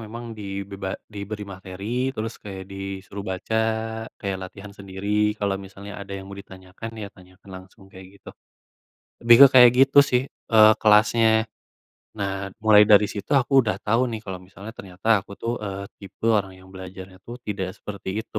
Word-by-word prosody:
memang 115 +2 -8
dibeba 100 -2 -6
diberi 105 0 -7
materi, 100 +6 -4
terus 110 +1 -5
kayak 95 -2 -8
disuruh 95 0 -7
baca, 95 +3 -4 0.6
kayak 100 -2 -3
latihan 100 +2 -10
sendiri. 105 +2 -2
Kalau 100 -2 -2
misalnya 100 +1 -10
ada 100 0 -9
yang 95 - -8
mau 100 - -11
ditanyakan, 95 +3 -10
ya 105 -2 -6
tanyakan 95 +1 -18
langsung 95 +1 -14
kayak 95 0 -12
gitu. - - -12 0.9
Lebih 120 0 +7
ke - - +9
kayak 125 -2 +9
gitu 135 +1 +4
sih, 125 -3 +1
eee, 110 -5 +4
kelasnya. 110 +1 +4 0.7
Nah, 100 -1 -3 0.2
mulai 105 -1 +7
dari 105 0 +7
situ 100 - -7
aku 130 +2 -6
udah 105 -4 -1
tahu 115 +3 +2
nih 110 - -4
kalau 95 -2 -6
misalnya 95 +4 -11
ternyata 100 +1 0
aku 100 - -12
tuh, 115 +1 -3
eee, 100 -1 -5 0.2
tipe 100 +2 -11
orang 95 -3 -1
yang 95 0 -17
belajarnya 95 0 -10
tuh 120 +5 -9
tidak 95 -3 -4
seperti 100 -2 -8 0.2
itu. 110 - -6
100 Hz, 165 wpm, -23 LUFS, 95-110 Hz, 0.9 s, ke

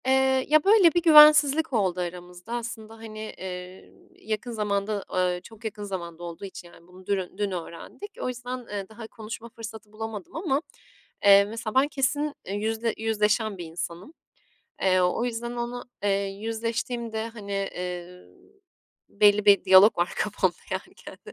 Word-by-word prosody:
Eee, 265 0 +3
ya 305 0 +4
böyle 395 -5 +6
bir 345 - +2
güvensizlik 300 -2 +7
oldu 190 -5 +1
aramızda. 180 +3 -7
Aslında 225 -2 -6
hani, 220 -1 -9 0.2
eee, 180 0 -8 0.3
yakın 220 +3 -4
zamanda, 210 -1 -1
ııı, 180 -1 +1
çok 225 +2 -15
yakın 210 -1 -5
zamanda 175 -4 -6
olduğu 170 +3 -7
için 185 -2 -10
yani 170 0 -18
bunu 185 +1 -16
dün 190 -2 -2
dün 205 -1 -1
öğrendik. 180 - -7
O - - -2
yüzden, 250 0 -4
ııı, 205 -6 -7
daha 220 0 -10
konuşma 225 +1 -8
fırsatı 225 -2 -10
bulamadım 215 -2 -7
ama, 310 -4 0 0.6
eee, 200 0 +8
mesela 220 +1 -6
ben 265 +2 +5
kesin 290 +1 -1
yüzle 220 +3 -1
yüzleşen 215 -1 0
bir 175 - -6
insanım. 170 - -7 0.7
Eee, 185 -1 +4
o 180 +6 +1
yüzden 235 0 -3
onu, 240 +1 -4 0.2
eee, 205 - +2 0.2
yüzleştiğimde 225 +2 -3
hani, 210 -3 -8
eee, 180 -2 -5 0.8
belli 205 0 +4
bir 200 -1 +6
diyalog 190 +2 +7
var 175 +1 +1
kafamda - - 0 0.2
yani - - -5
kendi - - -12
215 Hz, 150 wpm, -26 LUFS, 190-235 Hz, 0.8 s, eee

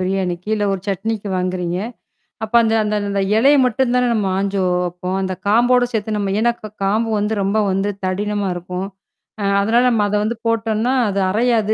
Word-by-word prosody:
பிரியாணிக்கு, 185 0 -2
இல்ல 210 -1 -1
ஒரு 195 - -3
சட்னிக்கு 205 +1 -2
வாங்குறீங்க. 180 -1 -2 0.7
அப்ப 220 +1 -6
அந்த 225 - +1
அந்த 210 0 -2 0.2
அந்த 200 0 0 0.2
இலைய 275 +6 +5
மட்டும் 250 +1 +1
தானே 250 0 +2
நம்ம 210 -3 0
ஆஞ்சு 195 0 -1 0.2
வப்போம்! 180 +1 -4
அந்தக் 185 -1 -4
காம்போட 245 +3 +4
சேத்து 220 -1 -2
நம்ம 195 -1 -1
ஏன்னா, 235 +1 +3
கா 215 - -7
காம்பு 215 +4 +1
வந்து 210 +2 -1
ரொம்ப 200 +3 0
வந்து 195 +2 0
தடிமனா 205 +1 -1
இருக்கும். 180 +2 -5 0.5
அ - - -2 0.2
அதனால 230 +4 +3
நாம 225 -4 +2
அத 210 - -1
வந்து 225 +2 -2
போட்டோன்னா, 225 +2 0 0.2
அது 200 0 -1
அறையாது. 220 -1 +2
205 Hz, 180 wpm, -19 LUFS, 190-225 Hz, 0.7 s, இலைய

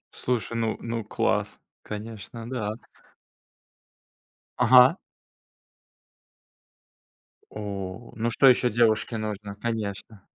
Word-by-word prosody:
Слушай, 120 -2 -2
ну 115 -1 -1
ну 115 -1 -4
класс, 105 - -1 0.2
конечно, 110 +2 -8
да. 110 -4 -3 1.8
Ага. 125 +6 +7 2.5
О! 100 0 -6
Ну 115 +1 -1
что 135 +4 +4
ещё 125 -1 +5
девушке 115 0 +2
нужно? 105 -2 -5
Конечно. 105 -2 -4
110 Hz, 80 wpm, -26 LUFS, 105-120 Hz, 2.5 s, Ага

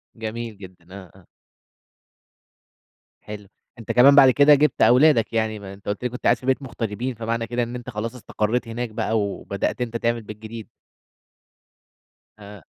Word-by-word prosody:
جميل 115 0 -6
جدّا، 90 -3 -14
آه، 95 -4 -11
آه. 90 - -23 1.9
حلو، 105 -1 -9 0.3
أنت 115 - -5
كمان 135 +3 +6
بعد 135 -2 +8
كده 145 +3 +6
جِبت 150 -1 +1
أولادك 125 -2 +4
يعني، 110 -1 -1
ما 100 -1 -9
أنت 100 0 -17
قُلت 100 +4 -3
لي 125 - 0
كنت 125 - -9
قاعد 120 - +3
في 125 - -13
بيت 130 +1 +1
مغتربين 120 -1 -4
فمعنى 115 +1 -3
كده 120 +1 -1
إن 120 +1 -6
أنت 125 0 -8
خلاص 115 +1 -5
استقريت 115 0 -2
هناك 120 +1 -4
بقى 110 0 -1
و - - 0 0.2
وبدأت 100 +5 -3
أنت 115 -1 -2
تعمل 115 0 -1
بيت 105 -1 -10
جديد. 110 0 -9 1.7
آه. 100 -2 -12
115 Hz, 170 wpm, -22 LUFS, 105-125 Hz, 1.9 s, بعد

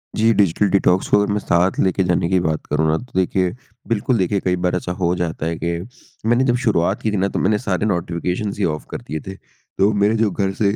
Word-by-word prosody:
जी। 110 +1 +3
Digital 100 0 +2
detox 95 -1 +2
को - - +5
अगर 105 - 0
मैं 105 - 0
साथ 90 0 +2
लेके 95 0 +2
जाने 90 -1 +1
की 95 -1 +3
बात 80 -3 -2
करूँ 80 +1 0
ना, 80 +1 +2
तो 125 +6 -11
देखिए 95 -1 +1 0.4
बिल्कुल 115 +3 +1
देखिए 100 +1 +1
कई 90 -1 +2
बार 90 0 -1
ऐसा 90 0 -3
हो 90 -1 0
जाता 85 -3 -3
है 85 0 -2
कि, 85 +3 -3 0.4
मैंने 120 +3 +3
जब 120 -2 +2
शुरुआत 95 -2 +1
की 110 - 0
थी - - -1
ना, 95 +1 +1
तो - - -3
मैंने 105 +2 +2
सारे 100 -4 -1
नोटिफ़िकेशंस 90 +1 -2
ही 100 - +2
ऑफ 75 -2 -3
कर - - -5
दिए 80 - -5
थे 95 - -6
तो 100 +1 -2
मेरे 105 +2 +2
जो 110 -2 +1
घर 95 0 -1
से 100 +1 +1
95 Hz, 245 wpm, -20 LUFS, 85-105 Hz, 0.4 s, को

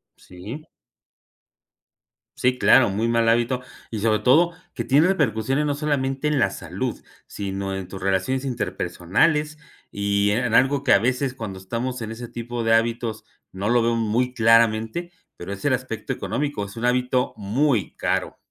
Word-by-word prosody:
Sí. 110 - -10 1.7
Sí, 125 0 +1
claro, 120 -6 +5
muy 110 +4 0
mal 115 -1 +2
hábito 120 +2 +1 0.3
y 110 - -4
sobre 110 0 +2
todo, 170 +7 +4 0.2
que 120 - -2
tiene 145 +8 +4
repercusiones 135 - +1
no 145 - 0
solamente 140 -1 -1
en 150 -1 +1
la 100 -7 +2
salud, - - -5 0.2
sino 95 -1 -4
en 95 -1 -5
tus 95 0 -8
relaciones 100 +8 0
interpersonales 135 - 0 0.3
y 100 0 0
en 120 +4 +1
en 115 - -2
algo 135 +2 +3
que 135 - +4
a 100 - +6
veces, 125 +3 0
cuando 105 -7 -6
estamos 120 +7 -4
en 110 - -5
ese 120 +1 -7
tipo 120 0 -5
de 115 0 +4
hábitos, 115 -1 -1 0.3
no 100 +3 -3
lo 120 0 +4
veo 115 0 +1
muy 115 +3 0
claramente, 115 +7 +3 0.2
pero 90 +3 -8
es 100 +7 -7
el 135 - +3
aspecto 130 -1 -3
económico, 140 -3 -3
es 100 +3 -9
un 120 - -2
hábito 125 +1 +1
muy 115 - 0
caro. - - -1
115 Hz, 165 wpm, -23 LUFS, 105-130 Hz, 1.7 s, a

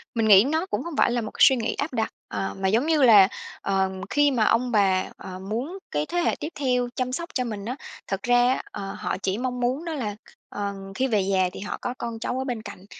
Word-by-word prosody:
Mình 225 -1 +2
nghĩ 200 -2 +8
nó 315 +6 0
cũng 380 - -3
hông 340 -2 -6
phải - - +4
là 240 0 0
một 215 - -5
suy 265 - +7
nghĩ 230 -3 -1
áp 285 0 -3
đặt, 225 -3 0 0.2
à, 195 - -3
mà 190 - +1
giống 225 +8 +2
như 315 -2 +2
là, 215 -7 +8 0.3
ờm, 190 -1 0
khi 290 0 +3
mà 240 -5 +2
ông 245 +3 +2
bà, 195 -4 +3
à, 185 -1 -8
muốn 235 - -4
cái 150 0 0
thế 350 - -4
hệ 345 - +1
tiếp 300 - -4
theo 250 -3 +1
chăm 255 -1 -1
sóc 335 +6 -4
cho 255 - 0
mình 210 -4 -5
á, 245 +3 -3 0.3
thật 195 0 -3
ra 245 0 +4
á, - - -3
ờ, 195 0 -5
họ - - -2
chỉ 190 +1 0
mong 250 +1 -3
muốn 255 +6 -1
đó 330 - -3
là 220 -9 -3
kh - - -18 0.2
ờ, 200 -1 -3 0.2
khi 265 - +1
về 220 -5 +2
già 190 -1 +1
thì - - -8
họ 205 - -4
có 245 - -3
con 235 -2 -5
cháu 245 +2 -2
ở - - -1
bên 245 -4 -3
cạnh 200 -3 -10
235 Hz, 265 wpm, -25 LUFS, 200-260 Hz, 0.3 s, nghĩ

